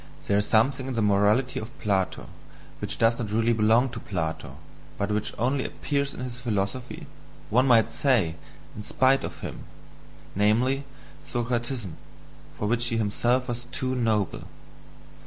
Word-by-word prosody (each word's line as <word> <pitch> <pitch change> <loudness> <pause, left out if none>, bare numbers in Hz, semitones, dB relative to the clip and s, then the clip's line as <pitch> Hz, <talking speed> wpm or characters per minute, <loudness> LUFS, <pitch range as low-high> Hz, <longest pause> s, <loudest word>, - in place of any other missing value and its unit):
There 100 0 +2
is 105 - +1
something 130 +4 +2
in 130 - -3
the 115 - +1
morality 105 +5 +2
of 120 +6 -9
Plato 95 -3 -1 0.5
which - - -3
does 115 +1 +3
not 110 -4 -3
really 115 +2 +2
belong 115 +4 +3
to 115 -1 -7
Plato, 80 -7 -4 0.4
but 100 +1 -1
which 105 0 -1
only 130 +3 +1
appears 140 -1 -2
in - - -8
his 125 -1 -5
philosophy, 115 +1 -3 0.5
one 125 +5 +4
might 115 -3 +5
say, 115 - +2 0.4
in 105 - -6
spite 130 +5 +3
of - - -6
him: - - -6 0.7
namely, 120 +7 +2 0.4
Socratism, 120 -5 -3 0.6
for 105 - -2
which 120 +2 +3
he 115 - 0
himself 120 +4 +1
was 120 0 -4
too 130 +1 -2
noble. 110 -6 0
115 Hz, 150 wpm, -26 LUFS, 105-125 Hz, 0.7 s, might